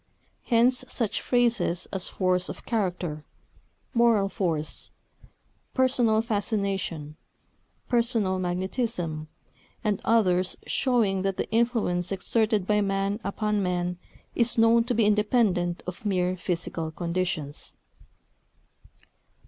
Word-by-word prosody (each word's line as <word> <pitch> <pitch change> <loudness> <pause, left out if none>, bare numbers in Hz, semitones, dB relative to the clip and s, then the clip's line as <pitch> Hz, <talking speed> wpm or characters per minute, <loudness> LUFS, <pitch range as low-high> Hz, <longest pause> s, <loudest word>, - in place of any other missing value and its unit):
Hence 245 +1 +3
such 225 -4 -1
phrases 235 -8 +1
as 190 -2 -2
"force 185 -1 0
of - - -8
character," 180 -8 -2 0.7
"moral 230 -4 +4
force," 165 -6 -2 0.9
"personal 245 -4 +3
fascination," 195 -8 -2 0.7
"personal 230 -6 +1
magnetism," 180 -3 -2 0.6
and 210 -2 0
others 185 -5 +2
showing 225 -8 +1
that 195 0 -1
the - - -1
influence 220 -6 +1
exerted 215 +1 +1
by 210 +1 +2
man 195 +1 0
upon 210 +1 -1
man 180 -1 -1 0.3
is 235 0 +2
known 230 +1 +5
to 245 0 0
be 225 -1 +3
independent 205 -5 +2
of 180 +3 -7
mere 185 -3 +1
physical 170 -2 -3
conditions. 170 -3 -3
195 Hz, 100 wpm, -26 LUFS, 180-230 Hz, 0.9 s, known